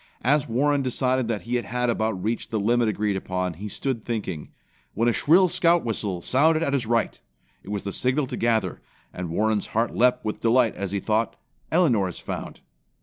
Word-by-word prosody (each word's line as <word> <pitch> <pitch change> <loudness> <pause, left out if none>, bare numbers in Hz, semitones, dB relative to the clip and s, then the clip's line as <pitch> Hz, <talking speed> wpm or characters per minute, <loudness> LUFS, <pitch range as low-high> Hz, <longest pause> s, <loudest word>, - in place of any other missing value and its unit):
As 145 +3 +2
Warren 140 +4 +2
decided 130 -1 0
that 115 -3 -2
he 120 +1 -1
had 125 +1 -2
about 110 -5 -1
reached 115 +2 -2
the 110 - -1
limit 120 +3 +2
agreed 105 -1 -1
upon, 90 -1 -2
he 100 +6 -7
stood 115 +2 -3
thinking, 100 -10 -4 0.5
when 115 - +1
the 120 - +3
shrill 180 +10 +5
Scout 175 -2 +2
whistle 100 -6 -3
sounded 155 +5 +3
at 140 - -1
his 125 -5 0
right. 115 -1 0 0.4
It - - -13
was 100 -1 -3
the 100 - -4
signal 130 +3 +1
to - - -5
gather, 110 -6 0 0.3
and 90 -2 -5
Warren's 105 +4 0
heart 115 +1 +1
leaped 125 0 +3
with 105 - -3
delight 115 0 +3
as 100 -2 -4
he 100 - -1
thought, 110 +2 0 0.4
"Elinor 130 - +3
is 90 - -7
found." - - -6
115 Hz, 195 wpm, -25 LUFS, 105-130 Hz, 0.5 s, shrill